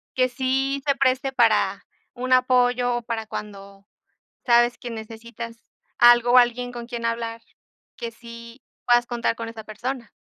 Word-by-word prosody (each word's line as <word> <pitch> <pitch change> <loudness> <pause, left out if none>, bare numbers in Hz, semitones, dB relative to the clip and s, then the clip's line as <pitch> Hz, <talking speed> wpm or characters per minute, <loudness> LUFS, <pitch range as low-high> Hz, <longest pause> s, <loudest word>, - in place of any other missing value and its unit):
que 255 0 +2
sí 270 +2 -1
se 280 - +3
preste 270 0 +1
para 215 -5 +2 0.3
un 255 +1 -1
apoyo 250 -1 +3
o 240 - -4
para 225 -1 -4
cuando 200 -1 -9 0.6
sabes 240 0 +4
que 240 - -7
necesitas 230 +1 -8 0.4
algo 240 0 +6
o 255 - +8
alguien 245 0 +2
con 240 -1 -7
quien 235 -1 -6
hablar, 230 0 -3 0.5
que 235 - -5
sí 235 +2 -12 0.2
puedas 240 0 +4
contar 235 -1 -1
con 230 0 -6
esa 225 -1 -9
persona. 235 +3 -6
240 Hz, 150 wpm, -23 LUFS, 230-250 Hz, 0.6 s, o